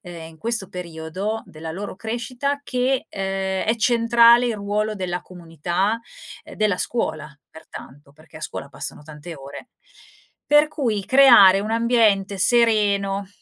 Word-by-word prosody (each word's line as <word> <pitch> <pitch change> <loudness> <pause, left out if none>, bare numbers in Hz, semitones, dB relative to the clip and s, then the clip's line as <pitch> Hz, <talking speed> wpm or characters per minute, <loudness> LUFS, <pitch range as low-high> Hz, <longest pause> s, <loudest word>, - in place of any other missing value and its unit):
ehm, 170 -4 -10
in 160 - -19
questo 220 0 -2
periodo 180 +5 -5
della 160 +1 -9
loro 195 +1 -7
crescita 250 +6 -3
che, 255 0 -1
ehm, 195 0 -3
è 225 - +2
centrale 235 +1 +4
il 235 - -1
ruolo 210 +1 -2
della 180 -3 -4
comunità, 180 +4 -3 0.5
ehm, - - -12
della 210 -3 0
scuola 155 -10 -3 0.2
pertanto, 145 -2 -13
perché 155 +2 -18
a - - -15
scuola - - -7
passano - - -6
tante 155 +2 -10
ore. 135 0 -11 0.8
Per 295 +1 +4
cui 230 -10 -2
creare 235 -8 +7
un 215 - -4
ambiente 225 -4 +1
sereno, 200 -3 +2
200 Hz, 140 wpm, -22 LUFS, 175-230 Hz, 0.8 s, creare